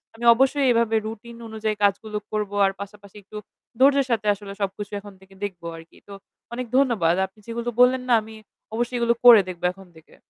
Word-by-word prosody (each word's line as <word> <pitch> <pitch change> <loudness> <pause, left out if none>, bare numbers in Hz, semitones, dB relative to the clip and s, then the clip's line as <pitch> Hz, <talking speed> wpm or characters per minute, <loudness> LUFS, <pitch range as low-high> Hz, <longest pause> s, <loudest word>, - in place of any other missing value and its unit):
আমি 235 - -6
অবশ্যই 270 +2 +2
এভাবে 230 -1 +1
রুটিন 230 +2 -8
অনুযায়ী 220 -1 -3
কাজগুলো 210 +1 0
করব। 210 -2 -2
আর 195 - +2
পাশাপাশি 200 0 -11
একটু 210 +2 -11 0.4
ধৈর্যের 275 0 +4
সাথে 220 -2 0
আসলে 200 0 -10
সবকিছু 200 +1 -4
এখন 205 0 -13
থেকে 190 0 -20
দেখব 190 -4 -5
আরকি। 165 0 -15
তো 200 - -10 0.4
অনেক 250 +1 -4
ধন্যবাদ। 225 -11 +2
আপনি 190 +3 -17
যেগুলো 235 +1 -4
বললেন 250 +1 +5
না - - +5
আমি 220 +1 -12 0.4
অবশ্যই 240 +2 -2
এগুলো 235 0 +2
করে 235 -4 +10
দেখবো 180 -1 -6
এখন 195 -1 -16
থেকে। 160 - -19
215 Hz, 185 wpm, -23 LUFS, 200-235 Hz, 0.4 s, করে